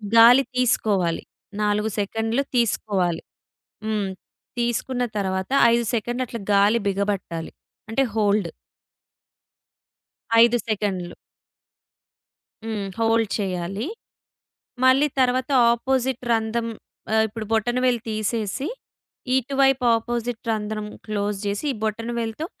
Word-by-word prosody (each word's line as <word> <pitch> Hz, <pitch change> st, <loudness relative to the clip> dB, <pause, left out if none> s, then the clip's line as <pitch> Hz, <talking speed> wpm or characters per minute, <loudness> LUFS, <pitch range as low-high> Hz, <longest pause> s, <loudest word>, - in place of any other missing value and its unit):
గాలి 240 Hz, +4 st, +8 dB
తీసుకోవాలి. 210 Hz, -8 st, +1 dB, 0.4 s
4 210 Hz, +1 st, +1 dB
సెకండ్‌లు 225 Hz, +6 st, 0 dB
తీసుకోవాలి. 195 Hz, -7 st, +1 dB, 0.6 s
హ్మ్. 210 Hz, -3 st, -1 dB, 0.5 s
తీసుకున్న 240 Hz, +1 st, -1 dB
తరువాత 190 Hz, +2 st, -2 dB, 0.2 s
5 235 Hz, 0 st, +2 dB
సెకండ్‌లు 240 Hz, +3 st, -1 dB
అట్లా 235 Hz, -, -6 dB
గాలి 205 Hz, +3 st, +4 dB
బిగబట్టాలి. 195 Hz, -4 st, -2 dB, 0.4 s
అంటే 270 Hz, +5 st, +2 dB
హోల్డ్. 205 Hz, -4 st, +2 dB, 1.9 s
5 240 Hz, +1 st, +4 dB
సెకండ్‌లు. 190 Hz, -4 st, -2 dB, 1.5 s
హ్మ్. 210 Hz, -3 st, -3 dB
హోల్డ్ 225 Hz, -2 st, +2 dB
చేయాలి. 195 Hz, -, -3 dB, 1.0 s
మళ్ళీ 270 Hz, +3 st, +5 dB
తరువాత 255 Hz, +2 st, +2 dB, 0.2 s
ఆపోజిట్ 260 Hz, +1 st, 0 dB
రంధ్రం 225 Hz, +1 st, 0 dB, 0.5 s
ఆహ్, 220 Hz, -, +4 dB
ఇప్పుడు 220 Hz, 0 st, -6 dB
బొటనవేలు 240 Hz, +2 st, +1 dB
తీసేసి 215 Hz, +4 st, -2 dB, 0.7 s
ఇటువైపు 270 Hz, 0 st, +2 dB
అపోజిట్ 235 Hz, 0 st, -3 dB
రంధ్రం 215 Hz, -1 st, -3 dB, 0.2 s
క్లోజ్ 205 Hz, -1 st, -2 dB
చేసి 200 Hz, +7 st, -2 dB
ఈ -, -, -3 dB
బొటన 225 Hz, +2 st, -2 dB
వేలుతో 230 Hz, +7 st, -3 dB
225 Hz, 95 wpm, -23 LUFS, 205-240 Hz, 1.9 s, గాలి